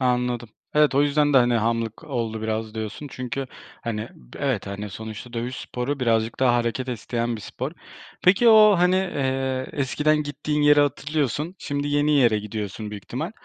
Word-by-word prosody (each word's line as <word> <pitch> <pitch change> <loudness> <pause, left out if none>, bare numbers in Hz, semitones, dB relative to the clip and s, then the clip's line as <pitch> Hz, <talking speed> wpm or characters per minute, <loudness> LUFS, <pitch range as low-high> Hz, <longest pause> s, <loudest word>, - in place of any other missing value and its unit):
Anladım. 125 -2 0 0.3
Evet, 150 -2 +4
o 140 - +5
yüzden 145 0 +2
de, - - +5
hani, 120 -1 +3
hamlık 115 +3 -1
oldu 115 -6 -3
biraz 110 0 -3
diyorsun 110 +6 -5
çünkü 130 +2 -4 0.4
hani 110 -1 -3
b - - -15
evet, 135 -9 -1
hani, 100 +1 -5
sonuçta 110 +3 -8
dövüş 120 +2 -3
sporu 130 +3 -4
birazcık 115 -1 +1
daha 125 -2 +4
hareket 120 +2 -1
isteyen 120 0 -2
bir - - -9
spor. 130 +7 -5 0.5
Peki 215 +6 +5
o, 215 -2 +8
hani, 180 +1 +4
eee, 135 -7 -1
eskiden 150 +2 +1
gittiğin 150 +1 -2
yeri 145 0 +6
hatırlıyorsun, 145 +2 -1
şimdi 145 0 -3
yeni 145 +1 +2
yere 120 -6 +4
gidiyorsun 105 0 -5
büyük 105 -2 -8
ihtimal. - - -4
125 Hz, 170 wpm, -24 LUFS, 115-145 Hz, 0.5 s, o